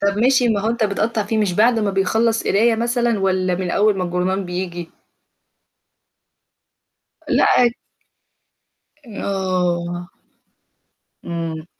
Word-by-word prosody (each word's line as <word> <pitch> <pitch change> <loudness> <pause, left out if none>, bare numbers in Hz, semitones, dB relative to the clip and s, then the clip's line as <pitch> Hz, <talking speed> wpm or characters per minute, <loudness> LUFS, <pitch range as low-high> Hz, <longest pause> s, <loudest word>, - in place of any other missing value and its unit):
طب 200 0 0
ماشي، 250 +1 +3
ما 210 -3 +1
هو 220 +2 0
أنت 230 -1 0
بتقطّع 215 +2 -1
فيه، 220 +2 -2
مش 205 -4 +1
بعد 225 +5 +3
ما 210 -2 0
بيخلّص 220 +4 +1
قراية 225 +3 +3
مثلًا؟ 235 0 0
والَّا 185 -1 0
من 180 0 -3
أول 210 +2 +2
ما 185 - -1
الجرنال 180 +2 -1
بييجي؟ 175 -1 -5 2.4
لأ - - +3
عادي. 240 -1 +3 1.5
آه. 175 -2 -2 1.1
إمم. 165 -2 -4
200 Hz, 115 wpm, -20 LUFS, 180-225 Hz, 2.4 s, ماشي